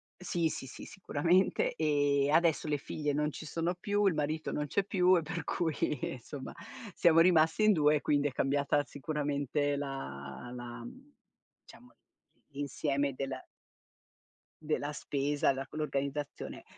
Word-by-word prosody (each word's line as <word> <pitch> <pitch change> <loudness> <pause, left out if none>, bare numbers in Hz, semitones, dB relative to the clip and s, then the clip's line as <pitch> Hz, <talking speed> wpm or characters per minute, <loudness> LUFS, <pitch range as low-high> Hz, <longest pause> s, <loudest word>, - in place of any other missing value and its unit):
sì, 175 -2 -1
sì, 135 - -5
sì, - - -9
sicuramente, 180 0 +1
ehm, 145 -2 +2
adesso 160 -2 +3
le 145 - +1
figlie 150 +1 -3
non 150 +1 +1
ci 155 - -8
sono 165 +4 -1
più, 205 +2 0
il 190 - +4
marito 155 +1 -2
non 150 0 -1
c'è 195 +6 0
più 185 -2 +4
e - - +1
per 165 0 -4
cui 165 -4 -1 0.4
insomma 130 +2 -8 0.4
siamo 165 -1 +5
rimasti 165 +3 +5
in 215 - +6
2 150 -2 +4
e 145 - 0
quindi 145 0 +2
è - - -3
cambiata 140 +2 +1
sicuramente 145 -1 -1
la 125 - -6
la, 120 -1 -7
mhmm, 275 - -12 0.5
diciamo 245 - -16
l - - -31 0.6
l'insieme 140 0 -1
della 135 -1 -4 1.2
della 150 -1 -1
spesa 140 0 0
da 135 0 -5
quell'organizzazione. 145 -1 -4
150 Hz, 145 wpm, -32 LUFS, 140-165 Hz, 1.2 s, in